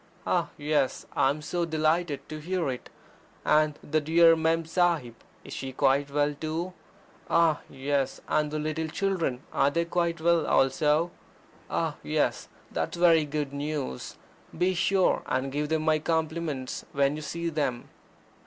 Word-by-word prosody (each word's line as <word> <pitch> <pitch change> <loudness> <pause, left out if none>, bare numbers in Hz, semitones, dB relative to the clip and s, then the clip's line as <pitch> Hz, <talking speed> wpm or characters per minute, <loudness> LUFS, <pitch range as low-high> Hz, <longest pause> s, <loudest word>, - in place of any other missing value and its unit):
Ah, - - +1
yes, 145 -2 0
I - - +4
am 150 +2 -3
so 170 +3 -1
delighted 155 -2 0
to 155 0 -6
hear 170 -2 -1
it 125 - -7 0.6
I 150 0 +5
And 150 -1 -2
the 155 +1 0
dear 165 +2 +6
Mem 165 0 +1
Sahib, 165 -7 +1 0.3
is - - -9
she 135 -1 -5
quite 140 +2 +2
well 145 +1 +1
too? 160 +5 -4 0.6
Ah, 165 -3 +4
yes! 135 0 -1
and 150 -1 +1
the 155 - -3
little 155 +1 -2
children 165 -7 -1
are 140 - +3
they 170 +4 0
quite 170 -1 0
well 170 -1 +2
also? 150 +5 +3 0.6
Ah, - - -1
yes - - 0
I - - -26
that's - - -2
very 165 -3 +5
goad 145 -1 -3
news! 140 - -4 0.4
Be 185 +1 +2
sure 190 +1 +2
and 130 +1 -1
give 150 +1 -2
them 160 -1 +1
my 155 -1 +3
compliments 160 -4 -2
when 140 +1 +2
you 155 - -6
see 170 +3 -3
them." 140 -6 -2
155 Hz, 160 wpm, -28 LUFS, 145-165 Hz, 0.6 s, dear